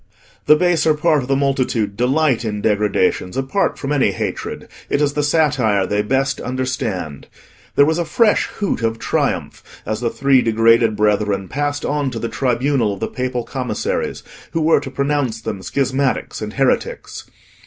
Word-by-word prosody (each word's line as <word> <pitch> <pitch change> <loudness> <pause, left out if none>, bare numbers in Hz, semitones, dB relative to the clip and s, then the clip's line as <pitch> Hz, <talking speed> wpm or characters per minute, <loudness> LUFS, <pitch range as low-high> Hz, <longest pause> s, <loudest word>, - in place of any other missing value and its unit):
The 150 - +8
baser 160 -2 +2
part 155 -1 +2
of 125 - -7
the 135 - +2
multitude 130 -7 0
delight 130 +1 +1
in 105 -2 -3
degradations, 105 -2 0
apart 135 +9 0
from 135 - -4
any 135 -8 +2
hatred; - - -4 0.2
it - - +1
is 145 -1 +1
the 150 - 0
satire 145 -10 +2
they 105 +2 0
best 135 +5 0
understand. 125 - -3 0.5
There 140 - +6
was 160 +3 +1
a 170 - 0
fresh 230 -1 +2
hoot 200 - -3
of 115 0 0
triumph - - -2 0.2
as 110 - -2
the 120 - 0
three 135 +1 +3
degraded 115 0 +3
brethren 105 -2 +1
passed 145 +3 -2
on 145 -2 0
to 120 - -6
the 115 +1 -3
tribunal 125 -4 0
of - - -13
the - - -2
Papal 125 -1 -3
Commissaries, 130 -1 -3 0.3
who 165 - 0
were 160 -1 +4
to 140 -1 -7
pronounce 140 -4 -1
them 100 -3 -5
schismatics 135 +3 -1
and 105 0 -5
heretics. 135 0 -1
130 Hz, 165 wpm, -19 LUFS, 110-145 Hz, 0.5 s, The